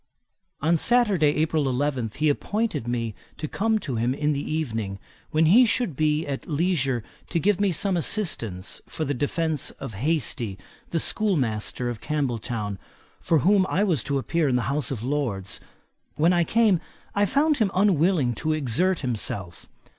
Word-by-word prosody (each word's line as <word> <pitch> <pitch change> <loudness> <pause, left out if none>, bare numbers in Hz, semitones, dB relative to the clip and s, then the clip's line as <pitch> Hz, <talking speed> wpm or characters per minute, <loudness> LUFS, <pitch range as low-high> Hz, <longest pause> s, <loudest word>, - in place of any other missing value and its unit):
On 165 +2 +3
Saturday, 200 -9 +3
April 155 -2 +1
11, 130 -2 -1
he 155 +2 +1
appointed 180 - -1
me 115 -2 -2 0.2
to 155 - -4
come 220 +7 +1
to 135 - -4
him 120 +3 0
in 150 +1 +1
the 140 - -2
evening, 115 -11 -3 0.3
when 155 +1 +3
he 210 +11 +7
should 230 - 0
be 155 +2 +1
at 140 +2 -5
leisure 145 - 0 0.3
to 170 - 0
give 200 +3 +2
me 200 -2 +3
some 190 +3 0
assistance 115 - -1
for 155 - -3
the 145 - -1
defence 150 +2 -1
of 130 -5 -6
Hastie, 120 - -1 0.3
the 165 - 0
schoolmaster 125 - 0
of 120 -3 -4
Campbelltown, 120 -8 -2 0.4
for 165 - +2
whom 195 -1 +4
I 200 - +2
was 170 - +1
to 140 0 0
appear 155 +2 0
in 125 - +1
the 125 +3 0
House 150 0 -1
of 120 -5 -4
Lords. 120 -9 -2 0.6
When 165 +4 +3
I 175 -1 +3
came, 220 -5 +3 0.3
I 205 0 +2
found 295 - +2
him 215 -4 +2
unwilling 175 -8 +3
to 155 0 +1
exert 155 +6 +1
himself. 105 - -3
150 Hz, 165 wpm, -25 LUFS, 125-180 Hz, 0.6 s, he